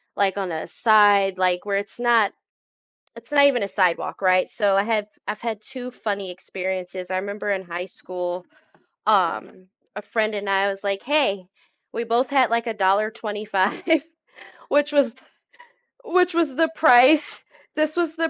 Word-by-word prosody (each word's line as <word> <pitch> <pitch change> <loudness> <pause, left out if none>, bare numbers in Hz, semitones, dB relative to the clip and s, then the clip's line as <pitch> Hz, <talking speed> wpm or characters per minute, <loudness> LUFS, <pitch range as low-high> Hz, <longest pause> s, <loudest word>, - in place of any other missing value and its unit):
like, 200 0 0
on 190 -3 -3
a 160 - -5
side 205 -4 +4
like, 180 0 0
where 200 -1 0
it's 200 +3 -6
not 235 -4 +3 0.8
it's 230 +3 -14
not 285 -1 +5
even 250 -7 +3
a - - -2
sidewalk, 185 -1 -1
right? 185 -1 +3
So, 200 -2 +1
I 195 - +3
have 215 -1 -1 0.2
I've 215 - -4
had 225 -3 -4
2 250 +1 -8
funny 200 -6 -4
experiences, 185 0 -6
I 185 - 0
remember 200 +1 -4
in 190 - -1
high 175 +1 -6
school, 180 -1 -6 0.6
um, 185 0 0 0.3
a 210 - -5
friend 215 0 -1
and 200 -1 -4
I 195 0 +2
was 195 0 -6
like, 195 -1 -2
"Hey," 240 -10 +1 0.5
we 235 - -2
both 235 +2 0
had 265 -4 +3
like 230 +1 0
$1.25, 210 -1 0 0.9
which 290 +1 +2
was 265 -4 +2 0.9
which 360 -4 +2
was 325 -5 0
the 325 +2 +2
price 290 +1 +5 0.3
this 310 +1 0
was 335 -2 0
the 325 0 0
210 Hz, 160 wpm, -22 LUFS, 190-245 Hz, 0.9 s, not